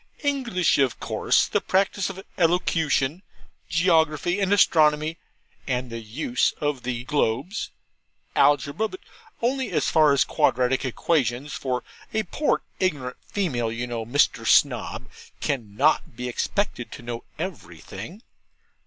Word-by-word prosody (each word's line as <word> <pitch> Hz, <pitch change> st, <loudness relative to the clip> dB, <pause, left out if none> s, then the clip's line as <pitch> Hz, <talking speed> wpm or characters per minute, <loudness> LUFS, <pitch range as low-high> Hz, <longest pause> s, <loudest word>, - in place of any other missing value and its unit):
English 250 Hz, -, +1 dB
of 135 Hz, -3 st, +1 dB
course; -, -, +2 dB
the -, -, 0 dB
practice 195 Hz, 0 st, +1 dB
of 190 Hz, 0 st, -8 dB
Elocution, 165 Hz, -3 st, +1 dB, 0.5 s
Geography, 165 Hz, 0 st, +2 dB
and 195 Hz, -1 st, +1 dB
Astronomy, 155 Hz, -4 st, +4 dB, 0.5 s
and 125 Hz, -2 st, -2 dB
the 115 Hz, -, -4 dB
Use 120 Hz, +3 st, -1 dB
of 145 Hz, -3 st, -1 dB
the 125 Hz, -1 st, -3 dB
Globes, 140 Hz, -, -1 dB, 0.7 s
Algebra 145 Hz, -, +3 dB
(but 375 Hz, -, -10 dB, 0.4 s
only 260 Hz, +2 st, 0 dB
as 150 Hz, -5 st, +1 dB
far 155 Hz, -2 st, +5 dB
as 140 Hz, -, +4 dB
quadratic 125 Hz, +2 st, +1 dB
equations); 130 Hz, 0 st, 0 dB
for 125 Hz, -2 st, -2 dB, 0.3 s
a 220 Hz, -, +2 dB
poor 290 Hz, -, 0 dB, 0.2 s
ignorant 145 Hz, -9 st, -1 dB
female, 125 Hz, -, -1 dB
you 120 Hz, +2 st, -3 dB
know, 120 Hz, -2 st, -4 dB
Mr. 125 Hz, +6 st, +2 dB
Snob, -, -, +2 dB, 0.3 s
cannot 130 Hz, +1 st, 0 dB
be 125 Hz, +2 st, -4 dB
expected 125 Hz, -, -2 dB
to -, -, -10 dB
know 120 Hz, 0 st, -5 dB
everything. 115 Hz, -, -7 dB
145 Hz, 125 wpm, -24 LUFS, 125-180 Hz, 0.7 s, far